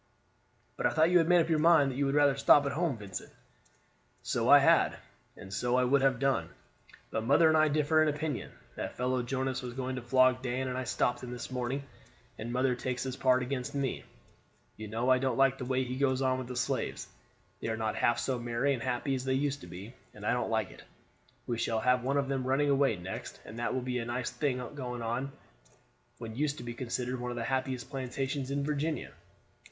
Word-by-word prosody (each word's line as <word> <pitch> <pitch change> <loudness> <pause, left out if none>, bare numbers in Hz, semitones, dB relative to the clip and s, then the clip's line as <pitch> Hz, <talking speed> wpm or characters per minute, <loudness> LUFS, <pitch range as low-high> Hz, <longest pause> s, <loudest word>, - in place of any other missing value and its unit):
"But - - +2
I - - +2
thought 160 +2 +3
you 180 - +6
had 165 - +2
made 175 -1 +6
up 165 - -2
your 160 -2 +2
mind 155 -4 +5
that - - -7
you 140 +1 +1
would 135 - 0
rather 145 -2 +4
stop 140 +1 +5
at 140 - 0
home, 155 -4 -1
Vincent?" 100 -3 -7 0.9
"So - - 0
I - - +10
had, - - +4 0.4
and 95 0 -10
so 120 +4 0
I 130 - +3
would 135 +2 +3
have 135 -2 +3
done, 135 +1 0 0.6
but 110 - -1
mother 145 +7 +5
and 160 - +4
I 155 0 +5
differ 155 +1 +2
in 155 - +4
opinion. 150 -2 -3 0.2
That - - -5
fellow 125 0 0
Jonas 130 +1 -2
was 125 -2 -7
going 130 0 -3
to - - -4
flog 130 +1 +3
Dan, 130 +1 -2
and 125 - -3
I 130 0 -3
stopped 120 - 0
him 125 - -7
this 125 +1 -6
morning, 130 +2 -2 0.6
and 115 +2 -5
mother 125 +1 +2
takes 125 +1 -3
his 130 -1 -4
part 130 -1 +3
against 135 +2 -4
me. 140 -2 -2 0.7
You 110 0 -7
know, 115 +4 0
I 130 - +5
don't 130 -2 0
like 135 0 +3
the 125 - -4
way 130 +1 0
he 125 0 -4
goes 135 -1 +2
on 130 -1 +1
with 130 - -6
the 125 - -6
slaves. 125 - -2 0.5
They - - -4
are 110 0 -1
not 110 -1 -1
half 120 - +2
so 130 -2 -1
merry 120 +4 0
and 125 - -4
happy 125 +2 -1
as 130 -1 -2
they 130 0 0
used 140 +1 -1
to - - -10
be, 95 +7 -9 0.2
and 105 0 -9
I - - +2
don't 125 -2 -1
like 110 -3 0
it. - - -13 0.6
We 120 -2 -2
shall 115 -1 0
have 125 +2 +3
one 135 +3 0
of 140 -1 +1
them 135 -1 -1
running 140 +2 +2
away 135 -4 +3
next, 90 +1 -7
and 115 - -9
that 120 - -1
will 130 - -1
be 125 -1 -2
a 115 - -3
nice 120 +1 -3
thing 140 -4 -1
on 125 0 -4 0.9
what 115 -2 -7
used 145 +2 -1
to - - -7
be 120 0 -5
considered 125 +1 -3
one 125 0 -3
of 120 - -5
the 115 - -2
happiest 130 +1 -2
plantations 135 0 -3
in 140 0 -1
Virginia. 150 +2 -2
130 Hz, 230 wpm, -30 LUFS, 120-140 Hz, 0.9 s, I